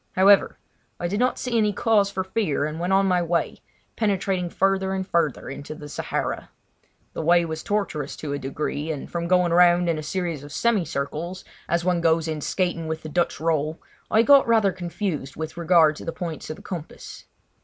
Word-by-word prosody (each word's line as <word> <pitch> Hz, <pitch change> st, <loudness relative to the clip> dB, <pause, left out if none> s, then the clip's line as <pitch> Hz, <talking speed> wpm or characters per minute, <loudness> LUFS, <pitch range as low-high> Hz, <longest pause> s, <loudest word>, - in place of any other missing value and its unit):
However, 195 Hz, +1 st, +5 dB, 0.4 s
I 175 Hz, -, -1 dB
did 205 Hz, +4 st, -2 dB
not 250 Hz, +1 st, +2 dB
see 250 Hz, -2 st, -3 dB
any 215 Hz, -2 st, +3 dB
cause 205 Hz, -1 st, +2 dB
for 190 Hz, -1 st, -2 dB
fear, 190 Hz, -7 st, -1 dB
and 155 Hz, +1 st, -4 dB
went 175 Hz, +2 st, -1 dB
on 195 Hz, +1 st, +4 dB
my 180 Hz, -2 st, +2 dB
way, 170 Hz, 0 st, -1 dB, 0.4 s
penetrating 195 Hz, -4 st, 0 dB
further 190 Hz, +1 st, +1 dB
and 190 Hz, 0 st, -3 dB
further 165 Hz, -7 st, 0 dB
into 140 Hz, +3 st, -7 dB
the 150 Hz, -, -9 dB
Sahara. 145 Hz, -, -3 dB, 0.6 s
The -, -, -4 dB
way 170 Hz, +2 st, +4 dB
was 160 Hz, -1 st, -4 dB
tortuous 195 Hz, -9 st, -2 dB
to 145 Hz, -2 st, -5 dB
a 145 Hz, -, -3 dB
degree, 145 Hz, +3 st, -3 dB
and 145 Hz, -3 st, -6 dB
from 170 Hz, 0 st, -2 dB
going 180 Hz, -1 st, +3 dB
round 175 Hz, 0 st, +5 dB
in 165 Hz, -2 st, 0 dB
a -, -, -4 dB
series 165 Hz, -2 st, -3 dB
of 145 Hz, -, -10 dB
semi 215 Hz, +2 st, +1 dB
circles, 160 Hz, +5 st, -4 dB, 0.3 s
as 170 Hz, 0 st, 0 dB
one 180 Hz, -2 st, +1 dB
goes 165 Hz, -1 st, +2 dB
in 155 Hz, -1 st, -3 dB
skating 175 Hz, -1 st, -1 dB
with 160 Hz, 0 st, -4 dB
the 155 Hz, -, -6 dB
Dutch 170 Hz, 0 st, 0 dB
roll, 155 Hz, 0 st, 0 dB, 0.3 s
I 220 Hz, +1 st, +4 dB
got 280 Hz, +1 st, +6 dB
rather 220 Hz, -4 st, +4 dB
confused 175 Hz, -5 st, -4 dB
with 160 Hz, 0 st, -5 dB
regard 170 Hz, -2 st, +4 dB
to -, -, -9 dB
the 165 Hz, -, -2 dB
points 165 Hz, -3 st, -6 dB
of 155 Hz, -, -4 dB
the -, -, -15 dB
compass. 170 Hz, -5 st, -8 dB
170 Hz, 200 wpm, -24 LUFS, 155-190 Hz, 0.6 s, got